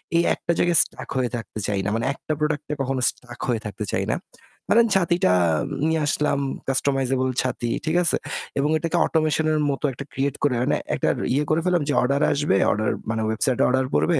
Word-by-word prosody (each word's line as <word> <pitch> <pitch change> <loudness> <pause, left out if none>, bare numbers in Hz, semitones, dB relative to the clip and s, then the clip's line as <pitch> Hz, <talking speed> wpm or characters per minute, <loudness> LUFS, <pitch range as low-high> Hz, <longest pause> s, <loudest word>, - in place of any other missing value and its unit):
এই 170 - +4
একটা - - -2
জায়গায় 175 -2 +3
stuck - - -11
হয়ে 125 -1 +1
থাকতে 110 -2 -6
চাই 100 -1 0
না। - - +1
মানে 115 - -1
একটা 155 - -7
product 150 -1 -1
এ - - +1
কখনো 135 -1 -1
stuck 120 -1 -11
হয়ে 115 -3 0
থাকতে 105 0 -5
চাই - - 0
না। - - -1 0.5
ধরেন 230 +1 +5
ছাতিটা 175 - +3 0.5
নিয়ে 160 0 +1
আসলাম, 145 -1 +1 0.3
customizable 135 -1 +1
ছাতি, 125 -2 -2 0.2
ঠিক 160 +2 0
আছে? - - +2 0.4
এবং 145 - +1
এটাকে 165 +2 -1
automation 155 -1 +1
এর 155 - +1
মতো 135 - -5
একটা 135 +3 -7
create 140 +1 -1
করে 140 -4 +2
এনে - - +1 0.2
একটার - - +1 0.2
ইয়ে 145 +3 +2
করে 155 +1 +3
ফেললাম 180 -3 +2
যে, 145 - +1
order 140 +3 +1
আসবে, 145 -8 +1 0.2
order 110 +1 0 0.2
মানে 110 0 -1
website-এ 120 +3 +1
order 130 +1 +2
পড়বে। 165 -4 +2
140 Hz, 200 wpm, -23 LUFS, 125-155 Hz, 0.5 s, ধরেন